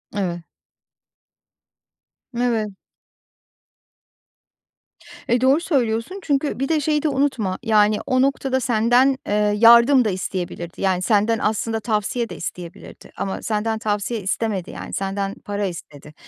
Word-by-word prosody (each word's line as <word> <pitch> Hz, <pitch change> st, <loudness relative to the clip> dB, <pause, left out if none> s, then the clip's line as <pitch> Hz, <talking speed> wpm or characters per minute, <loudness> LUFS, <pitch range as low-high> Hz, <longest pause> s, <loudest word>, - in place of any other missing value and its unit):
Evet. 175 Hz, -4 st, -2 dB, 1.9 s
Evet. 230 Hz, -4 st, 0 dB, 2.5 s
E, 240 Hz, +1 st, +2 dB
doğru 265 Hz, +4 st, +4 dB
söylüyorsun. 260 Hz, -, -1 dB
Çünkü 285 Hz, -2 st, -1 dB
bir 270 Hz, -, -1 dB
de 320 Hz, -1 st, +2 dB
şeyi 300 Hz, 0 st, 0 dB
de 310 Hz, -, +2 dB
unutma, 265 Hz, -9 st, 0 dB
yani, 215 Hz, -2 st, +3 dB
o 255 Hz, 0 st, +2 dB
noktada 270 Hz, -1 st, 0 dB
senden, 245 Hz, +3 st, +3 dB
eee, -, -, -1 dB, 0.2 s
yardım 235 Hz, +3 st, +7 dB
da -, -, +2 dB
isteyebilirdi. 180 Hz, -2 st, -5 dB
Yani, 185 Hz, -2 st, +1 dB
senden 215 Hz, +3 st, +2 dB
aslında 220 Hz, +2 st, -1 dB
tavsiye 220 Hz, +2 st, -2 dB
de -, -, -7 dB
isteyebilirdi 175 Hz, -1 st, -9 dB
ama 195 Hz, -, -3 dB
senden 220 Hz, 0 st, -1 dB
tavsiye 210 Hz, +2 st, -2 dB
istemedi. 195 Hz, -1 st, -2 dB
Yani, -, -, -8 dB
senden 195 Hz, 0 st, -3 dB
para 205 Hz, 0 st, -2 dB
istedi. 150 Hz, -5 st, -8 dB
220 Hz, 120 wpm, -21 LUFS, 200-255 Hz, 2.5 s, yardım